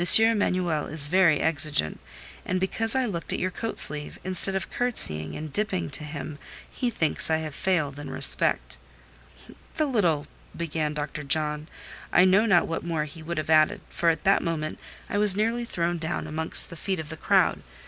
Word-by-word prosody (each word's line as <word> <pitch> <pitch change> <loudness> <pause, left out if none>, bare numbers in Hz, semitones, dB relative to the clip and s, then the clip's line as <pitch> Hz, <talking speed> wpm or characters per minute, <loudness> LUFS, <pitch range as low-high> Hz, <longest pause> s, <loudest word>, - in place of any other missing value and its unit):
Emanuel 185 -8 +1
is 145 -2 +3
very 175 -3 +4
exigeant, 150 - +1 0.4
and 185 - -1
because 225 +5 0
I 260 -1 +2
looked 175 -7 -4
at - - -1
your 185 - -1
coat 225 +4 -5
sleeve, 150 -1 -4
instead 185 +1 +2
of 195 - -3
curtseying 80 - -2
and 155 -1 -7
dipping 90 - -1
to - - -1
him, 150 0 -7 0.3
he 250 - -3
thinks 160 -10 0
I 160 - +2
have 155 -2 -5
failed 150 -6 -1
in 145 - -7
respect." - - 0 1.0
"The 310 - +1
little—" 175 - +1 0.3
began 155 -2 -2
Dr. 150 0 -4
John: 150 +1 -1 0.4
I 180 - +5
know 195 +4 +4
not 180 -5 +4
what 165 - -4
more 165 -3 -2
he 155 +2 -11
would 170 +1 -5
have 155 0 -2
added, 160 +6 +4
for 170 - +1
at 165 - -1
that 195 0 +3
moment 155 -2 -3 0.3
I 205 - -1
was 205 -2 +7
nearly 230 +3 0
thrown 170 -4 -2
down 160 0 -3
amongst 160 +3 0
the - - -8
feet 190 +3 -3
of 160 -2 -6
the 160 - -6
crowd. - - +2
165 Hz, 185 wpm, -26 LUFS, 150-190 Hz, 1.0 s, was